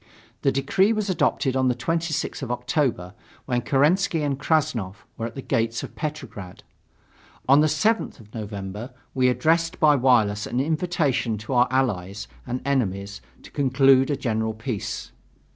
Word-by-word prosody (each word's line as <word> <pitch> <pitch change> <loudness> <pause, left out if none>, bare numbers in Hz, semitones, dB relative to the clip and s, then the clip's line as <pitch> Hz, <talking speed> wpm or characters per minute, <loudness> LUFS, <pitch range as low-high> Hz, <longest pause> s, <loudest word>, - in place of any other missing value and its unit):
The 135 - +3
decree 160 +10 +2
was 210 -3 -1
adopted 140 -5 +1
on 130 0 +2
the 125 - +2
26th 165 +5 -2
of 130 - -4
October, 125 - -1 0.3
when 125 -2 0
Kerensky 155 +5 +2
and 140 -2 -1
Krassnov 115 - -1
were 115 - -3
at 115 - -11
the 135 - -6
gates 115 0 -1
of - - -8
Petrograd. 130 - -6 0.8
On 140 +2 +6
the 155 - +4
7th 220 +8 0
of 105 -2 -17
November, 105 +2 -6 0.2
we 130 -1 +3
addressed 165 +6 +1
by 150 -2 +5
wireless 115 -6 +3
an 120 - -2
invitation 150 -6 0
to 105 +5 -5
our 125 0 +4
Allies 100 -7 -1 0.2
and 125 +1 -3
enemies 100 -7 -1 0.2
to - - -13
conclude 135 -1 +4
a 145 - +1
general 110 -2 -1
peace. 110 -2 -4
130 Hz, 155 wpm, -24 LUFS, 110-150 Hz, 0.8 s, On